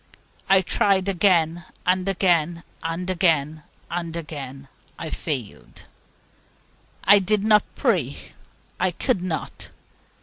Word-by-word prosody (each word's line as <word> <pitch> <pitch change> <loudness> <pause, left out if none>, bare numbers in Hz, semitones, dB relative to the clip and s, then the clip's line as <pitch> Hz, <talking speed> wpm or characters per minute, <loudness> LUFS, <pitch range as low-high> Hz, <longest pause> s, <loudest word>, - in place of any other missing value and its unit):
I 195 0 +6
tried 190 +1 +1
again, 175 -3 +2 0.2
and 185 +1 +1
again; 175 -3 +1 0.2
and 165 +2 -3
again, 160 -5 +1 0.3
and 170 -1 -3
again 140 -4 -7 0.3
I 160 - -6
failed. 130 -10 -5 1.2
I 205 +1 +7
did 200 +1 0
not 210 -1 +5
pray. - - 0 0.6
I - - +2
could 250 -9 -1
not. 180 -3 -5
175 Hz, 105 wpm, -23 LUFS, 160-190 Hz, 1.2 s, I